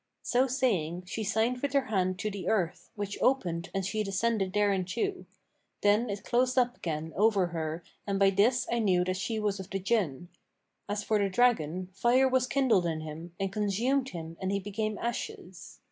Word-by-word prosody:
So 255 +2 +2
saying, 185 - 0
she 220 +4 -4
signed 225 +4 0
with 285 0 -1
her 275 -2 +3
hand 185 -5 0
to 215 - -1
the 200 -1 -6
earth, 185 -6 -1
which 205 -1 -4
opened 175 -11 +1
and 195 0 -2
she 215 +3 -1
descended 195 0 0
thereinto: 205 - 0 0.5
then 210 +3 +3
it 200 -1 -4
closed 255 +2 +1
up 245 -1 +3
again 160 -1 -4
over 205 -2 +3
her 165 0 -4 0.2
and 200 -1 0
by 195 0 +5
this 235 +6 +3
I 235 - +1
knew 185 -5 +3
that 185 +1 -1
she 220 +3 -2
was 205 -2 -1
of 190 0 -7
the 195 - -2
Jinn. 185 - -1 0.6
As 205 0 -2
for 215 0 +1
the 200 -1 +1
dragon, 185 -6 +2
fire 240 +7 +4
was 260 -1 +2
kindled 240 -11 +3
in 160 -1 -2
him 160 +2 -8
and 195 0 -2
consumed 235 +7 +1
him 165 -3 -7
and 190 0 -1
he 200 - +1
became 210 +2 -3
ashes. 190 -6 -5
200 Hz, 190 wpm, -29 LUFS, 185-235 Hz, 0.6 s, by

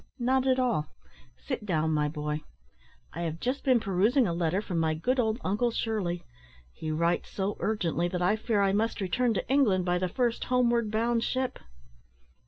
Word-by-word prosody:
"Not 260 +1 +1
at 260 -1 +3
all; 240 - +1 0.5
sit 65 - -5
down, 160 -5 0
my 150 -1 +1
boy. 150 0 -3 0.7
I 170 - -5
have 165 -1 -3
just 255 +7 -2
been 255 -3 +4
perusing 215 +7 +2
a 175 - -1
letter 170 +2 0
from 185 -5 -3
my 160 -1 +1
good 255 +11 0
old 220 -1 +1
uncle 210 +6 +1
Shirley: 205 -7 -2 0.5
he 155 - -6
writes 170 +3 0
so 195 +1 -2
urgently 175 -5 0
that 180 0 -3
I 180 +4 +3
fear 220 -2 0
I 195 -1 +2
must 225 +3 0
return 225 +5 +1
to - - -2
England 220 -10 +3
by 180 0 +1
the 185 0 -1
first 240 +3 0
homeward 240 -3 +2
bound 230 +2 +1
ship." 260 0 -2
205 Hz, 185 wpm, -28 LUFS, 170-240 Hz, 0.7 s, been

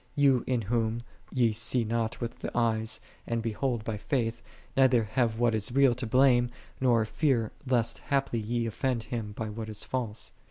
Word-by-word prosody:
Ye 140 -3 +5
n 125 -2 +1
Him, - - -6
Whom 115 0 0 0.3
ye 120 -3 +3
see 115 +3 +1
not 115 0 -1
with 120 -1 -5
the - - -4
eyes, 110 -2 +1 0.3
and 115 -1 -1
behold 115 +1 -1
by 110 -1 -3
faith, 115 0 -1 0.3
neither 130 -3 +5
have 110 +1 0
what 120 -1 +3
is 110 +1 +1
real 135 -2 +5
to 120 0 -4
blame, 125 0 +4 0.3
nor 120 -4 +3
fear 120 -3 +1 0.2
lest 120 -3 +2
haply 135 -4 0
ye 115 +2 -1
offend 115 +1 -1
Him 115 -4 -4
by 110 0 -4
what 110 +1 -6
is 105 - -4
false. 115 -4 -3
115 Hz, 185 wpm, -29 LUFS, 110-125 Hz, 0.3 s, Ye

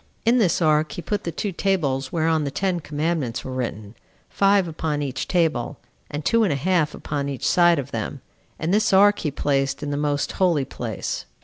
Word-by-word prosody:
In 240 +2 +4
this 180 -5 +2
ark 155 0 +2
he - - -5
put 205 -1 -2
the 170 - -2
two 205 +4 -3
tables 145 -9 0
whereon 160 -1 +1
the 140 - -1
ten 185 +3 -1
commandments 150 -5 -2
were 130 - -5
written, 110 -5 -4 0.4
five 195 -2 +3
upon 155 -2 -2
each 135 -2 -3
table, 160 -9 0 0.3
and 145 +1 -5
two 230 -1 +3
and 200 - +2
a - - +1
half 155 0 +1
upon 140 -1 -3
each 135 -3 -3
side 175 -1 +5
of 140 -1 -4
them; 115 +4 -4 0.4
and 165 +4 -1
this 215 0 +2
ark 205 +2 +6
he 155 - -1
placed 140 0 -1
in 145 - -3
the 145 - -1
most 145 -1 0
holy 170 -7 +1
place. 120 -5 -5
155 Hz, 200 wpm, -23 LUFS, 140-180 Hz, 0.4 s, ark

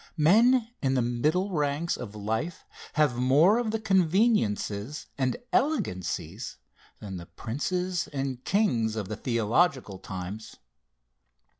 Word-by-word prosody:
Men 225 +10 +5
in 135 -1 +1
the 130 - +3
middle 150 +12 0
ranks 150 +1 0
of 105 -3 -8
life 110 +11 -3 0.3
have 150 -5 +2
more 145 - +5
of 240 -2 -1
the 225 +1 -1
conveniences 170 - +1
and 130 -2 0 0.2
elegancies 95 - -1 0.4
than 95 -3 -6
the 85 -1 -9
princes 180 +9 -2
and 135 -3 -4
kings 120 - +1
of 105 -4 -4
the 110 - -3
theological 115 - +1
times. 95 +3 -7
140 Hz, 120 wpm, -27 LUFS, 110-180 Hz, 0.4 s, Men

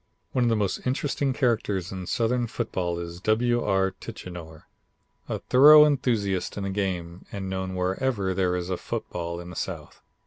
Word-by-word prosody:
One 125 -2 +1
of - - +3
the 115 - +3
most 105 +3 -1
interesting 135 +1 0
characters 110 -8 0
in 95 -2 -6
Southern 120 +1 0
football 95 -7 -2
is 85 0 -7
W. 120 +3 +2
R. 95 -1 +2
Tichenor, 85 -3 -9 0.7
a - - -1
thorough 150 +4 +8
enthusiast 115 -11 0
in 100 - -3
the 100 - -2
game 90 -3 -3
and 95 -1 -5
known 95 0 -3
wherever 95 +2 0
there 90 -1 +1
is 90 +1 -3
a 90 - 0
football 85 -1 -4
in 85 0 -8
the - - -10
South. - - -6
95 Hz, 170 wpm, -26 LUFS, 90-120 Hz, 0.7 s, thorough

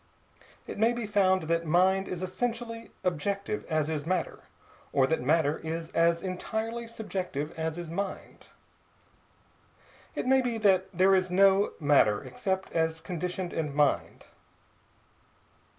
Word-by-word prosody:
It - - -7
may 225 +2 +4
be 240 -2 -3
found 190 -3 +2
that 165 +1 0
mind 190 +4 +3
is 180 0 -4
essentially 230 +3 -3
objective 195 +4 -2
as 155 -2 +1
is 155 -2 -2
matter, 180 +2 -2 0.5
or 135 -2 +4
that 160 +4 0
matter 150 +2 +2
is 165 +1 -5
as 170 0 +2
entirely 220 +5 -3
Subjective 185 -9 -4
as 160 0 -3
is 170 -2 -6
mind. 195 +3 -5 1.7
It - - -2
may 265 +1 +4
be 245 -2 -2
that 190 -3 +3
there 190 +1 +4
is 185 -1 +2
no 195 +2 +4
matter 145 -9 +3
except 190 +9 -3
as 160 -1 0
conditioned 180 +1 -4
in 150 -3 -3
mind. 145 -1 +1
185 Hz, 135 wpm, -29 LUFS, 160-200 Hz, 1.7 s, may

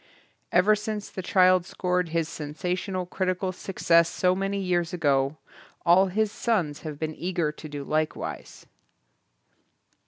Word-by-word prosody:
Ever 200 +4 +5
since 210 0 -5
the 190 - -5
child 185 -1 +4
scored 180 -2 -1
his 165 -1 0
sensational 180 +5 -3
critical 185 +1 -1
success 170 -3 +2
so 180 0 +2
many 195 +1 -1
years 175 -2 0
ago, 140 -3 +1 0.5
all 180 +3 +6
his 210 +3 0
sons 175 -13 -1
have 155 -3 -6
been 155 +1 -3
eager 170 -2 -1
to 155 0 -10
do 145 -1 -5
likewise. 155 +2 -3
180 Hz, 130 wpm, -26 LUFS, 155-190 Hz, 0.5 s, all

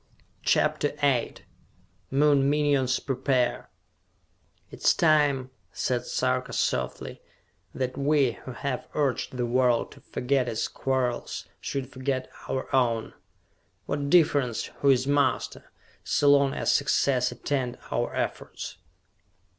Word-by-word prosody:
CHAPTER 145 - +1
VIII 135 -4 0 0.6
Moon 140 0 +3
Minions 140 -3 +2
Prepare 130 -2 0 1.0
"It - - -11
is - - +5
time," 145 -5 +3 0.2
said 125 -2 -2
Sarka 130 0 -1
softly, 65 0 -2 0.5
"that 130 +1 -3
we 140 -2 +3
who 130 +2 -10
have 130 +1 -4
urged 135 -3 -1
the 120 - 0
world 120 0 +2
to - - -15
forget 130 -1 -1
its 110 -1 -1
quarrels 130 -2 -2
should 135 -2 -4
forget 130 0 -3 0.2
our 130 - -1
own. 115 -3 +1 0.7
What 140 0 -2
difference 145 -8 +2
who 140 - +3
is 130 -1 +4
master, 145 0 0 0.3
so 145 -1 +3
long 140 -1 +4
as - - +1
success 130 -3 +2
attend 125 0 -2
our - - -1
efforts?" - - -4
130 Hz, 115 wpm, -27 LUFS, 125-140 Hz, 1.0 s, is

